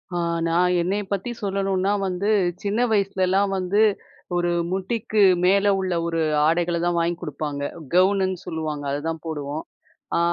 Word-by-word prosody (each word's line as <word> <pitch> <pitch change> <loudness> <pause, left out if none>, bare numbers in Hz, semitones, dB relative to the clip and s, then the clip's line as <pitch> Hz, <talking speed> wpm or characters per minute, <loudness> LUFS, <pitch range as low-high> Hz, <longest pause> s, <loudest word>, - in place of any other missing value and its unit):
ஆ - - 0 0.3
நான் 180 +2 +2
என்னைய 200 +4 -1
பத்தி 200 +5 -3
சொல்லணும்ன்னா 195 0 0
வந்து, 185 +3 -1 0.3
சின்ன 205 +3 -1
வயசுலலாம் 195 -1 +2
வந்து 190 +3 +1 0.5
ஒரு 175 0 +1 0.2
முட்டிக்கு 210 +2 -1 0.2
மேல 200 +2 +4
உள்ள 185 -1 -1
ஒரு 165 -1 -1 0.3
ஆடைகள 170 +1 +1
தான் 175 0 +1
வாங்கி 170 +1 0
குடுப்பாங்க. 145 -1 -4 0.3
கவுனுன்னு 190 0 +3
சொல்லுவாங்க, 155 -4 -4
அத 145 - -1
தான் 165 0 -5
போடுவோம். 150 -1 -4 0.5
அ - - +3
185 Hz, 140 wpm, -23 LUFS, 165-195 Hz, 0.5 s, மேல